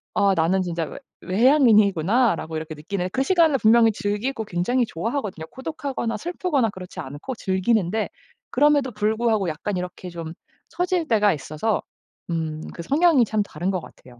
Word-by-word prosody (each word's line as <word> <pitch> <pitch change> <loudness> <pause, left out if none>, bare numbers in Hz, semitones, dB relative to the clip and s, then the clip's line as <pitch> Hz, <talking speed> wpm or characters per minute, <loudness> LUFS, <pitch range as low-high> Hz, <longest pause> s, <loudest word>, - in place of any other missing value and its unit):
'아 200 -2 +4
나는 175 +4 +2
진짜 170 -2 -2
외 - - -9 0.2
외향인이구나.'라고 215 - +3
이렇게 155 0 -5
느끼는 180 +4 -3
그 265 - 0
시간을 325 -2 +4
분명히 225 +1 +5
즐기고 220 +3 -2
굉장히 220 +7 0
좋아하거든요. 210 - -3
고독하거나 265 -3 -4
슬프거나 335 -8 0
그렇지 185 -2 -10
않고 145 - -6
즐기는데 195 +1 0 0.4
그럼에도 290 -1 +3
불구하고 215 -2 +1
약간 180 +5 -3
이렇게 180 0 -6
좀 165 -2 -7 0.4
처질 360 -2 -1
때가 210 -5 +4
있어서 155 +9 -2 0.5
음 160 -2 -2
그 170 - -7
성향이 295 - +4
참 215 0 0
다른 180 0 -3
것 185 - -1
같아요. 125 -5 -16
210 Hz, 380 characters per minute, -23 LUFS, 175-255 Hz, 0.5 s, 분명히